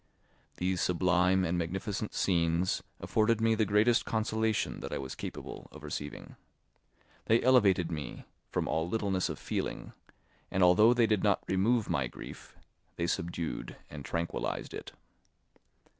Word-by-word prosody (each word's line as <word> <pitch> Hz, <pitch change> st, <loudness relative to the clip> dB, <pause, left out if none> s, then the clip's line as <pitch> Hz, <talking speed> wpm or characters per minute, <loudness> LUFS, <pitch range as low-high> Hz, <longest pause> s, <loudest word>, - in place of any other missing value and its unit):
These 90 Hz, 0 st, 0 dB
sublime 90 Hz, +1 st, +3 dB
and 90 Hz, +1 st, 0 dB
magnificent 95 Hz, +5 st, -3 dB
scenes 85 Hz, 0 st, +1 dB, 0.2 s
afforded 110 Hz, +1 st, +2 dB
me 115 Hz, 0 st, +3 dB
the 110 Hz, -1 st, +1 dB
greatest 105 Hz, +4 st, +4 dB
consolation 110 Hz, -1 st, 0 dB
that -, -, -6 dB
I -, -, -1 dB
was 65 Hz, -1 st, -5 dB
capable -, -, -7 dB
of -, -, -12 dB
receiving. 75 Hz, 0 st, -6 dB, 0.9 s
They 115 Hz, +1 st, +4 dB
elevated 100 Hz, -9 st, +4 dB
me 75 Hz, -6 st, -5 dB, 0.2 s
from -, -, -1 dB
all 80 Hz, +1 st, 0 dB
littleness 100 Hz, -3 st, 0 dB
of -, -, -4 dB
feeling, -, -, -4 dB, 0.6 s
and 95 Hz, -, +2 dB
although 105 Hz, +7 st, +6 dB
they 120 Hz, -1 st, +4 dB
did 105 Hz, -3 st, +1 dB
not 100 Hz, -2 st, +2 dB
remove 105 Hz, +4 st, +2 dB
my 70 Hz, -3 st, 0 dB
grief, -, -, -10 dB, 0.4 s
they 85 Hz, -, -1 dB
subdued 85 Hz, -1 st, -3 dB, 0.2 s
and 70 Hz, -2 st, -7 dB
tranquillised 85 Hz, +3 st, -3 dB
it. -, -, -7 dB
95 Hz, 140 wpm, -31 LUFS, 85-110 Hz, 0.9 s, although